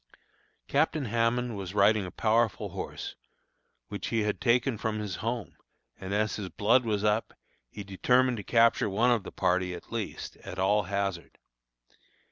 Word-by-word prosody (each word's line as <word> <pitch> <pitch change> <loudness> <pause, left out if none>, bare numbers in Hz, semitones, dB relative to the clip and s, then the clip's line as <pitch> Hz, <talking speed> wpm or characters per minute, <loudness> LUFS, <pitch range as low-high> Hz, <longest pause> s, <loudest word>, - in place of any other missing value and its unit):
Captain 150 0 +1
Hammond 115 +1 0
was 95 -1 -6
riding 100 -1 +4
a - - -5
powerful 110 +2 +1
horse, - - -6 0.7
which 100 -2 -5
he 115 -2 0
had 105 0 -2
taken 125 +1 +2
from 110 0 -2
his 105 -5 -4
home, 115 -2 -3 0.4
and 95 0 -6
as 105 +1 0
his 100 -3 -5
blood 115 +7 +3
was 105 -2 0
up, 105 +1 +1 0.3
he 105 - -8
determined 125 +6 +2
to 105 - -5
capture 115 0 +3
one 115 +6 +3
of 120 -3 +2
the 100 - -9
party 90 0 0
at 85 - -12
least, 115 -3 -5
at 95 - -9
all 100 +1 +2
hazard. 100 -5 -3
105 Hz, 160 wpm, -29 LUFS, 100-115 Hz, 0.7 s, riding